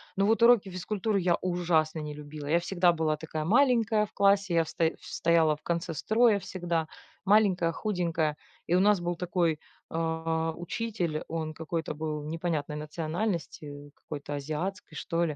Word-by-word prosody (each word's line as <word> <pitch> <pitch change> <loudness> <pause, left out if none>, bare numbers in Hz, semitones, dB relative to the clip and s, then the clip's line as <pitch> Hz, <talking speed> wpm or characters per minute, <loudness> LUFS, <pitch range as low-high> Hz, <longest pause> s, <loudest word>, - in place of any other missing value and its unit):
Но 195 - +2
вот 225 +2 +2
уроки 235 -4 +6
физкультуры 200 +3 -1
я 175 -2 +2
ужасно 170 -3 +1
не 150 -1 -5
любила. 150 0 -8
Я 170 +3 +3
всегда 175 0 +2
была 160 -2 0
такая 155 0 -5
маленькая 225 - +3
в - - -27
классе, 200 -2 +3
я 165 - +4
в 160 - -9
стоя 165 -1 0
стояла 165 -2 +2
в 150 - -20
конце 170 0 -2
строя 220 - +3
всегда. 170 -4 -2 0.4
Маленькая, 195 -4 +4
худенькая. 170 -7 -1 0.3
И 170 - -1
у 180 - +5
нас 205 0 +4
был 175 0 -1
такой, 170 -3 0 0.3
а, 160 0 -1
учитель, 175 -3 -3
он 160 -1 -3
какой-то 160 0 -3
был 150 -1 -4
непонятной 160 -2 -2
национальности, 155 -2 -4
какой-то 145 -1 -7
азиатской, 155 +8 -4
что 170 -1 -1
ли. 155 -3 -3
170 Hz, 160 wpm, -29 LUFS, 155-195 Hz, 0.4 s, уроки